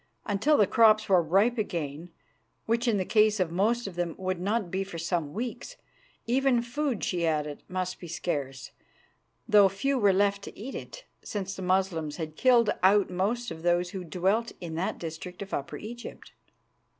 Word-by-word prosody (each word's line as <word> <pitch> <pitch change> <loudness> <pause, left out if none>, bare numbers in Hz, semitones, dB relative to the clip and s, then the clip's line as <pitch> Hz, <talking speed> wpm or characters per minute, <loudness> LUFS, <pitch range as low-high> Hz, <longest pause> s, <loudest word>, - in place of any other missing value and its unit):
Until 225 +9 +2
the 210 - +5
crops 215 0 +4
were 185 -3 +5
ripe 200 +9 +2
again, 165 -4 -4 0.6
which 235 +2 0
in 225 -3 +3
the 185 - -1
case 215 0 +3
of 180 -3 0
most 220 +7 +1
of 195 - -5
them 175 -2 -2
would 185 -1 -2
not 200 0 -1
be 190 +1 -1
for 190 -3 -8
some 165 -3 -2
weeks, 245 - -5 0.5
even 250 0 +2
food, 255 -1 -2
she 175 -2 -1
added, 150 -2 -1
must 185 0 -3
be 175 - -9
scarce, 140 -6 -4 0.8
though 205 -2 +6
few 265 +8 -1
were 205 -3 +5
left 200 +1 +2
to - - -10
eat 255 +6 -6
it, - - -8 0.2
since 195 -2 -4
the 190 - -7
Moslems 180 -5 0
had 155 -2 -6
killed 240 +1 +4
out 195 +1 +4
most 220 +7 -1
of 160 - -7
those 175 +1 +1
who 190 -2 -5
dwelt 195 +7 0
in 170 -2 -6
that 170 +4 -2
district 175 +3 -7
of 195 - -12
Upper 140 - -3
Egypt. 240 +3 -9
195 Hz, 180 wpm, -28 LUFS, 175-225 Hz, 0.8 s, though